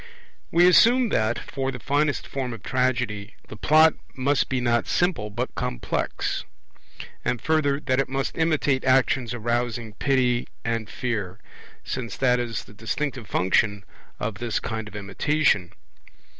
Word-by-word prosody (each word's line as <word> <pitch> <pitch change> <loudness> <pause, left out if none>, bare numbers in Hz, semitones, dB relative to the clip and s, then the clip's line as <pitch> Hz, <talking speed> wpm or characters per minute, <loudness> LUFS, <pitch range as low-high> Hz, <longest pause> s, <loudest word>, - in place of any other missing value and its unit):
We 175 +1 +5
assume 235 +7 +6
that, 110 - +1
for 135 -1 -3
the 125 - -6
finest 145 +3 0
form 130 -3 -4
of 115 - -10
Tragedy, 125 -5 -1
the - - -8
Plot 155 +7 +5 0.2
must 140 +2 +1
be 130 - 0
not 120 -1 +1
simple 170 - 0
but 120 +5 -4
complex; - - -2 0.8
and 125 - 0
further, 145 0 +1
that 130 -2 +1
it 135 - 0
must 135 0 -2
imitate 155 -5 +1
actions 130 -2 +2
arousing 120 -1 -2
pity 125 0 +1 0.2
and 115 -2 -2
fear, 105 -7 -3 0.5
since 125 -3 -4
that 125 -2 +3
is 115 -2 -3
the - - -16
distinctive 120 +2 -3
function 100 +2 +1 0.4
of 105 0 -3
this 120 -3 -1
kind 110 -2 -4
of 110 - -12
imitation. 100 - +1
125 Hz, 145 wpm, -25 LUFS, 110-140 Hz, 0.8 s, assume